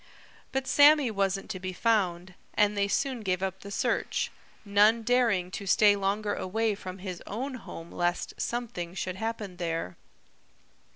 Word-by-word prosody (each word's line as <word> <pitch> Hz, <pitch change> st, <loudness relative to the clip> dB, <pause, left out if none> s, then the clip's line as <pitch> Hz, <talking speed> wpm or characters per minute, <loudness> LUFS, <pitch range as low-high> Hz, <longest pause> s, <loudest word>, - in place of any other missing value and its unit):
But 265 Hz, 0 st, -1 dB
Sammy 290 Hz, -3 st, +6 dB
wasn't 195 Hz, -1 st, -1 dB
to 185 Hz, -, -5 dB
be 185 Hz, 0 st, -4 dB
found, 185 Hz, -4 st, 0 dB, 0.2 s
and 210 Hz, 0 st, +3 dB
they 200 Hz, 0 st, +1 dB
soon 260 Hz, +4 st, 0 dB
gave 185 Hz, -3 st, -1 dB
up 190 Hz, 0 st, -2 dB
the 200 Hz, -, -9 dB
search, 200 Hz, -, -1 dB, 0.3 s
none 210 Hz, +3 st, +4 dB
daring 225 Hz, -7 st, +2 dB
to 200 Hz, 0 st, -6 dB
stay 205 Hz, +2 st, +5 dB
longer 205 Hz, +1 st, -1 dB
away 220 Hz, +3 st, 0 dB
from 185 Hz, -2 st, -7 dB
his 185 Hz, -2 st, -6 dB
own 260 Hz, +6 st, -4 dB
home 170 Hz, -9 st, -9 dB
lest 175 Hz, 0 st, -1 dB
something 200 Hz, -8 st, -3 dB
should 185 Hz, 0 st, -3 dB
happen 220 Hz, -4 st, -4 dB
there. 165 Hz, -, -3 dB
200 Hz, 155 wpm, -28 LUFS, 185-225 Hz, 0.3 s, Sammy